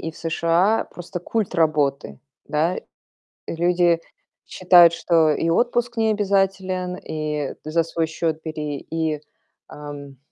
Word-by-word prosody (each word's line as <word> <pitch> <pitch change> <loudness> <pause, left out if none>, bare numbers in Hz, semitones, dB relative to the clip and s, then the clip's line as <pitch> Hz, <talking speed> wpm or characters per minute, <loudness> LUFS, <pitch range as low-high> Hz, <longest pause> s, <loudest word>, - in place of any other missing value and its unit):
и 165 - -4
в 160 - -18
США 170 +6 +1
просто 175 0 -7
культ 220 +2 -2
работы, 145 - 0 0.3
да? 160 +4 +1 0.7
Люди 175 0 +2 0.5
считают, 175 -2 +6
что 165 -2 +3
и 165 - 0
отпуск 240 +4 0
не 220 0 +2
обязателен, 195 -3 0
и 150 -4 -4
за 160 +2 +1
свой 165 0 -2
счёт 160 0 -2
бери, 150 -3 -4
и, 160 -2 -1 0.5
ам 145 -2 -9
165 Hz, 120 wpm, -22 LUFS, 155-185 Hz, 0.7 s, считают